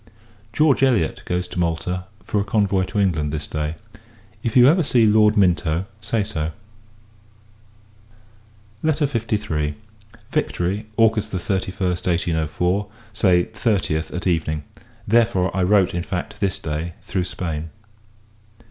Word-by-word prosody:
George 150 Hz, +3 st, +3 dB
Elliot 120 Hz, -12 st, +2 dB
goes 90 Hz, 0 st, -1 dB
to -, -, -5 dB
Malta, 90 Hz, +2 st, -1 dB, 0.2 s
for 105 Hz, -, 0 dB
a -, -, 0 dB
convoy 100 Hz, -2 st, +1 dB
to 105 Hz, -, -6 dB
England, 80 Hz, -7 st, +1 dB
this 75 Hz, -1 st, -3 dB
day. 75 Hz, +1 st, -3 dB, 0.7 s
If 115 Hz, +1 st, 0 dB
you 125 Hz, 0 st, +8 dB
ever 170 Hz, +6 st, +5 dB
see 125 Hz, -7 st, +3 dB
Lord 105 Hz, 0 st, +4 dB
Minto, 90 Hz, -2 st, +2 dB, 0.2 s
say 110 Hz, -1 st, 0 dB
so. 80 Hz, -6 st, -3 dB, 2.3 s
LETTER 155 Hz, -1 st, +2 dB
LIII. 105 Hz, -, -1 dB, 0.6 s
Victory, 100 Hz, +5 st, -1 dB
August 110 Hz, -2 st, +3 dB
31st, 95 Hz, -1 st, -2 dB
1804 90 Hz, +3 st, 0 dB, 0.3 s
Say 90 Hz, -5 st, +3 dB
30th, 95 Hz, -8 st, -1 dB
at 90 Hz, -, -5 dB
Evening. 80 Hz, -4 st, 0 dB, 0.4 s
Therefore, 105 Hz, -5 st, +2 dB
I 95 Hz, -, +1 dB
wrote, 95 Hz, 0 st, +3 dB
in 85 Hz, -, -1 dB
fact, 90 Hz, 0 st, -5 dB
this 100 Hz, -3 st, 0 dB
Day, 80 Hz, +2 st, -4 dB
through 90 Hz, -2 st, -2 dB
Spain. 80 Hz, -3 st, -4 dB
95 Hz, 125 wpm, -22 LUFS, 85-105 Hz, 2.3 s, you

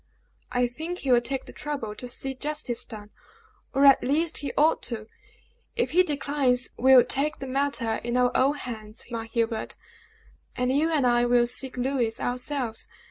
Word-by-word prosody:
"I 245 Hz, 0 st, +2 dB
think 320 Hz, +9 st, -5 dB
he 275 Hz, -7 st, -2 dB
will 240 Hz, -1 st, +5 dB
take 260 Hz, +2 st, -3 dB
the -, -, -12 dB
trouble 280 Hz, -8 st, -4 dB
to 250 Hz, +3 st, -8 dB
see 265 Hz, +2 st, -4 dB
justice 280 Hz, -3 st, -3 dB
done, 210 Hz, -3 st, -10 dB, 0.6 s
or 275 Hz, +1 st, +3 dB
at 275 Hz, -1 st, +7 dB
least 310 Hz, +5 st, +1 dB
he 280 Hz, -3 st, -3 dB
ought 310 Hz, +2 st, +4 dB
to. 225 Hz, -3 st, -5 dB, 0.7 s
If 470 Hz, -, 0 dB
he 360 Hz, -, +5 dB
declines, 280 Hz, -6 st, +1 dB
we 265 Hz, +2 st, +5 dB
will 250 Hz, -, +9 dB
take 300 Hz, +3 st, +1 dB
the 270 Hz, -, -6 dB
matter 260 Hz, -4 st, 0 dB
in 240 Hz, +1 st, -1 dB
our 250 Hz, 0 st, +3 dB
own 275 Hz, +3 st, +3 dB
hands, 220 Hz, -5 st, -7 dB
my 230 Hz, -1 st, -3 dB
Hubert; 225 Hz, -1 st, -2 dB, 0.8 s
and 250 Hz, 0 st, 0 dB
you 300 Hz, +4 st, +2 dB
and 300 Hz, -5 st, +1 dB
I 240 Hz, 0 st, +3 dB
will 240 Hz, 0 st, +4 dB
seek 250 Hz, +2 st, -3 dB
Louis 250 Hz, -3 st, 0 dB
ourselves. 250 Hz, -2 st, -2 dB
255 Hz, 180 wpm, -26 LUFS, 240-285 Hz, 0.8 s, will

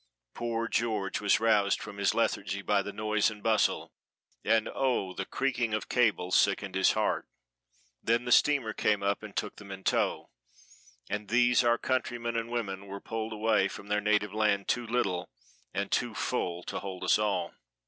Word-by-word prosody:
Poor 115 Hz, -1 st, -2 dB
George 110 Hz, -5 st, -1 dB
was 105 Hz, -, +3 dB
roused 105 Hz, -3 st, +3 dB
from 100 Hz, -, -8 dB
his 100 Hz, -1 st, +1 dB
lethargy 100 Hz, +1 st, -1 dB
by 100 Hz, -1 st, +2 dB
the 105 Hz, -, -5 dB
noise 105 Hz, +1 st, +1 dB
and 105 Hz, -1 st, -10 dB
bustle; 110 Hz, -1 st, +1 dB, 0.5 s
and 110 Hz, -1 st, +2 dB
oh, 125 Hz, -8 st, 0 dB
the 95 Hz, -, -4 dB
creaking 120 Hz, -5 st, 0 dB
of 110 Hz, -, -5 dB
cables 105 Hz, -7 st, +2 dB
sickened 100 Hz, -1 st, +2 dB
his 95 Hz, 0 st, +3 dB
heart. -, -, 0 dB, 0.7 s
Then 115 Hz, +2 st, +1 dB
the 120 Hz, -, -2 dB
steamer 135 Hz, -5 st, +4 dB
came 105 Hz, -2 st, +1 dB
up 100 Hz, +1 st, 0 dB
and 110 Hz, -2 st, -10 dB
took 105 Hz, -, -3 dB
them 100 Hz, -1 st, -12 dB
in 95 Hz, 0 st, -8 dB
tow, -, -, 0 dB, 0.8 s
and 105 Hz, 0 st, -4 dB
these 120 Hz, +2 st, +4 dB
our 120 Hz, 0 st, +3 dB
countrymen 120 Hz, -2 st, -2 dB
and 115 Hz, 0 st, -2 dB
women 100 Hz, -5 st, -3 dB
were 100 Hz, +1 st, -6 dB
pulled 115 Hz, +1 st, -4 dB
away 110 Hz, -2 st, +2 dB
from 100 Hz, 0 st, -9 dB
their 105 Hz, 0 st, +1 dB
native 105 Hz, -1 st, +1 dB
land 105 Hz, -2 st, +1 dB
too 120 Hz, -1 st, 0 dB
little 95 Hz, -7 st, -1 dB, 0.4 s
and -, -, -3 dB
too -, -, 0 dB
full 85 Hz, 0 st, -2 dB
to -, -, -4 dB
hold 95 Hz, -2 st, -6 dB
us 90 Hz, -, +3 dB
all. 100 Hz, -5 st, -1 dB
105 Hz, 180 wpm, -29 LUFS, 100-115 Hz, 0.8 s, steamer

